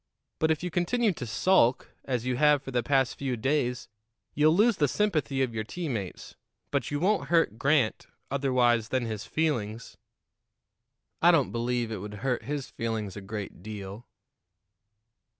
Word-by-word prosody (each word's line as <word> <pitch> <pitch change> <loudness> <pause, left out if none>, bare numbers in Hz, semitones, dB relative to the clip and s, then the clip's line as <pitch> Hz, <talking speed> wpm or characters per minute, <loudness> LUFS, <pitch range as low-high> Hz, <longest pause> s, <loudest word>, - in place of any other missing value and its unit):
But 160 - +2
if 160 +1 0
you 180 - -3
continue 210 +7 +1
to 125 -6 -6
sulk, 125 - +2
as 125 -3 -2
you 130 -1 0
have 150 0 +4
for 135 - -7
the 125 -1 +1
past 135 +1 +1
few 130 -3 -2
days, 125 0 0 0.5
you'll 155 +2 +4
lose 215 +2 +4
the 145 - +3
sympathy 145 - 0
of 125 -3 -2
your 110 -1 -2
teammates; 115 - -5 0.4
but - - -1
you 145 - -2
won't 200 +5 +1
hurt 165 -10 +2
Grant 140 -5 +2 0.2
otherwise 125 -5 +2
than 130 -2 0
his 110 0 -4
feelings." 115 -6 -2 1.2
"I 170 - +6
don't 165 -6 +4
believe 120 -1 -1
it 110 - -3
would 105 +2 -7
hurt 125 -2 0
his 145 -1 -3
feelings 110 -4 -4
a 105 - -7
great 100 -2 -6
deal." 105 +2 -8
130 Hz, 160 wpm, -28 LUFS, 115-150 Hz, 1.2 s, I